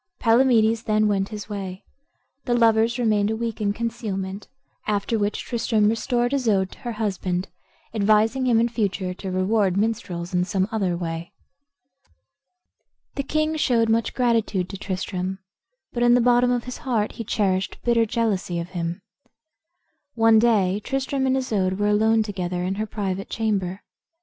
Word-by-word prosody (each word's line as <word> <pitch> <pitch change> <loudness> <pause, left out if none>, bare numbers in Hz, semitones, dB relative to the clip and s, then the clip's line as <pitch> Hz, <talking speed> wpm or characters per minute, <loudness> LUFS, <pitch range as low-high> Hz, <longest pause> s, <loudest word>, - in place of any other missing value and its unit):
Palamedes 230 -2 +3
then 215 0 +2
went 195 -1 0
his 210 -2 -7
way. 195 -3 -6 0.6
The 245 -2 +1
lovers 230 0 +3
remained 215 -4 +2
a 220 - 0
week 230 -1 -4
in 200 -1 +1
concealment, 205 -3 -4 0.4
after 210 +2 0
which 205 0 -1
Tristram 225 -3 +1
restored 240 +2 0
Isoude 210 -9 +1
to - - -14
her 240 -3 -5
husband, 190 -4 -2 0.4
advising 220 +4 +2
him 235 -2 +4
in 235 - +3
future 200 -5 -2
to 190 +1 -7
reward 190 +1 +1
minstrels 195 -5 -2
in 180 0 +2
some 190 +1 0
other 190 -6 0
way. 165 -1 -5 1.8
The 280 - -2
king 310 +3 0
showed 230 -6 +2
much 225 0 +1
gratitude 225 -7 +1
to 195 - -6
Tristram, 185 0 -3 0.6
but 240 - -2
in 240 0 +5
the - - +4
bottom 245 +1 +4
of 245 -1 0
his 250 - -7
heart 225 -5 -1
he 230 - -6
cherished 195 -3 0
bitter 230 -1 +3
jealousy 210 -6 -1
of 170 +1 -4
him. 175 +1 -4 1.1
One 225 -1 +5
day 210 -4 +2
Tristram 270 0 -1
and 260 0 +2
Isoude 195 -8 0
were 205 0 +1
alone 220 +1 +3
together 180 -4 -3
in 185 +1 -1
her 220 - -2
private 195 -2 -3
chamber. 200 -4 -2
215 Hz, 155 wpm, -23 LUFS, 190-235 Hz, 1.8 s, in